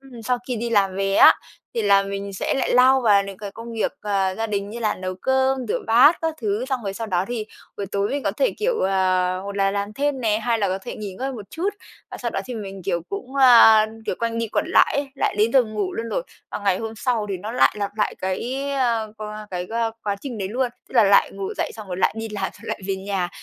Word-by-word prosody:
ừm, 255 -4 -12
sau 250 +2 0
khi 245 - -1
đi 235 +1 -3
làm 195 -3 +2
về 195 0 0
á, - - +8 0.4
thì 230 - 0
là 200 -1 +5
mình 200 0 -5
sẽ 190 - -1
lại 265 -2 0
lao 260 +1 +6
vào 205 -5 +4
những 195 -1 -8
cái 205 -1 -6
công 230 +3 -9
việc, 225 - -1
à, 195 -2 0
gia 225 +3 -2
đình 200 -1 -3
như 235 - -6
là 215 - +1
nấu 185 0 -5
cơm, 265 +4 +1
rửa - - 0
bát 255 +9 +6
các 320 -1 0
thứ. 215 +2 -1
Xong 260 -2 -1
rồi 195 -2 -4
sau 225 +1 -4
đó 185 -2 0
thì 225 -3 -3 0.3
buổi 200 - -4
tối 200 +1 -1
mình 285 0 -2
có - - +1
thể, - - +1
kiểu, 475 +2 0
ờ, 185 -1 +1
hột 200 +1 -6
là 195 0 +2
làm 200 +1 -3
thêm 280 +1 -1
nè, 215 -2 +1
hai 230 -1 0
là 200 -2 +1
có 190 +1 -1
thể 215 - -8
nghỉ 205 -3 -6
ngơi 265 +7 -3
một 215 -5 -9
chút, 355 +5 -2 0.4
và - - -6
sau - - -3
đó - - -2
thì 250 - -6
mình, 195 -3 -7
kiểu, 175 -2 -1
cũng, 245 +7 -6
ơ, 230 -4 +8 0.2
kiểu, - - 0
quanh 230 -1 -2
đi 230 - -1
quẩn - - 0
lại - - +4
ấy, 285 -1 -1
lại - - 0
đến 220 +2 +3
giờ 265 - +6
ngủ 210 -4 -3
luôn 230 0 -4
rồi. - - -1 0.3
Và - - -4
ngày 195 -3 +1
hôm 225 0 -5
sau 230 -3 -1
thì 190 - -1
nó 210 +5 -6
lại 250 - +4
lặp 200 0 -2
lại 210 - 0
cái, 255 +9 -3
ơ 230 -5 0
qua 215 0 -7
cái, 180 -1 -4
ơ 230 0 0
quá 200 -1 -1
trình 250 -6 -6
đấy 190 -2 -3
luôn, 245 +4 0 0.2
tức - - -17
là 230 -4 +6
lại 200 0 +5
ngủ 195 0 -4
dậy, - - -1
xong 215 -3 -10
rồi 180 - -4
lại 190 - +2
đi 225 0 -4
làm 205 -2 -4
xong - - -16
lại - - -3
về 195 -1 -1
nhà, 190 -2 -2
215 Hz, 270 wpm, -23 LUFS, 195-245 Hz, 0.4 s, á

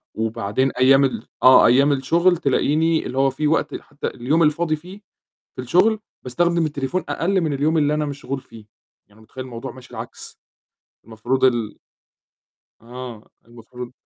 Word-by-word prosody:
وبعدين 110 +3 -1
أيام 135 +2 +4
ال 120 -3 -2 0.2
آه. 130 0 +8
أيام 135 +4 +4
الشغل 170 +7 +2
تلاقيني 160 +2 +1
اللي 130 - -5
هو 135 0 +3
فيه 150 +3 -2
وقت 160 - 0
حتى 145 - -7
اليوم 140 +7 0
الفاضي 155 +1 +1
فيه 180 +6 -13 0.5
في - - -5
الشغل 185 - +2 0.2
باستخدم 170 +6 0
التليفون 150 +4 -3
أقل 190 +3 0
من 155 -3 -1
اليوم 150 +4 +1
اللي 150 -1 +2
أنا 150 0 0
مشغول 140 -1 -5
فيه، 110 -3 -15 0.4
يعني 105 +2 -22
متخيِّل 120 +4 -9
الموضوع 125 +1 -7
ماشي 130 -1 -15
العكس، - - -9 0.7
المفروض 115 +4 -2
ال 120 -5 +1 1.0
آه، 120 -1 -10
المفروض 120 +1 -11
135 Hz, 150 wpm, -21 LUFS, 125-155 Hz, 1.0 s, آه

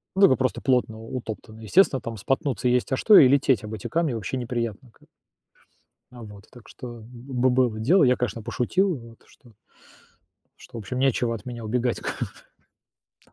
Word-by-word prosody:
Да, 195 +1 +7
ну 130 - +3
просто 130 -1 -1
плотно 125 -4 0
утоптанный, 110 -1 -8
естественно, 135 - +3
там 115 -1 -6
споткнуться 130 +2 -1
есть, 125 +2 +1
а - - +2
что 215 +7 +6
и 130 - +9
лететь 135 -5 +2
об 105 +1 -7
эти 105 - -6
камни 160 -5 0
вообще 115 +3 -4
неприятно 120 -1 -4
как - - -30
бы. - - -23 1.0
А 120 -2 -11
вот. 105 -2 -12
Так 120 -3 -16
что 120 -3 -10
бы 125 +1 -1
было 125 -3 +1
дело, 155 - +4
я, 125 -1 +4
конечно, 115 -2 -3
пошутил 160 - 0
вот 115 -2 -13
что 120 - -21 1.1
что - - -11
в - - -4
общем, 120 +5 -5
нечего 125 -3 +1
от 115 - -11
меня 120 -2 -7
убегать 120 +2 -1
как - - -5 1.0
бы. - - -31
125 Hz, 185 wpm, -24 LUFS, 115-130 Hz, 1.1 s, и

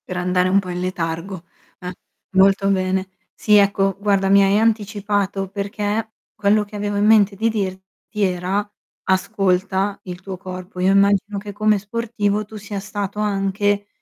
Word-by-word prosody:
Per 180 - -4
andare 180 0 +1
un 195 +2 +4
po' 185 -2 -6
in 180 0 -3
letargo, 180 0 -4 0.4
eh, 180 0 -6 0.4
molto 195 +1 +4
bene. 190 0 0 0.2
Sì, 210 - +2
ecco, 195 -1 +2
guarda 200 -2 +1
mi 200 0 +6
hai 195 +1 +3
anticipato 205 -3 0
perché 205 +2 -3 0.2
quello 210 +1 +2
che 205 - -13
avevo 205 0 -2
in 205 - +2
mente 210 -2 +5
di 225 +3 +1
dirti 195 0 -4
era: 185 +2 -1 0.4
ascolta 190 0 0
il 180 -1 -7
tuo 190 0 -7
corpo. 185 0 -8
Io 185 +1 +3
immagino 200 +1 +3
che 205 +1 -7
come 215 +1 +2
sportivo 210 0 -2
tu 215 +1 -10
sia 205 -1 -6
stato 200 +1 -5
anche 205 0 0
200 Hz, 160 wpm, -20 LUFS, 190-205 Hz, 0.4 s, mi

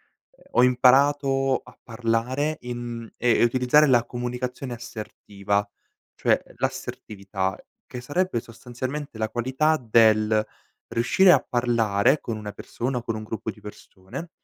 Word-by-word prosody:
ehm, - - -28
ho 125 - +4
imparato 135 +1 +4
a - - -16
parlare 125 +6 -1
in 120 -2 -6
ehm, 120 -1 +2
e - - +6
utilizzare 130 +5 +4
la 120 -3 +4
comunicazione 125 +1 -4
assertiva, 105 -3 -4 0.5
cioè - - +2
l'assertività 95 -2 -4 0.3
che 125 - -7
sarebbe 145 +1 -1
sostanzialmente 125 +4 -7
la 110 0 -1
qualità 130 +7 +1
del 110 -3 +3 0.4
riuscire 155 +11 +4
a - - +7
parlare 120 -1 +1
con 115 - -4
una 105 -1 -6
persona 125 +4 -4
o - - -7
con 115 - -2
un 110 - -5
gruppo 110 0 -5
di 105 - -19
persone, 105 - -10
120 Hz, 135 wpm, -24 LUFS, 110-130 Hz, 0.5 s, a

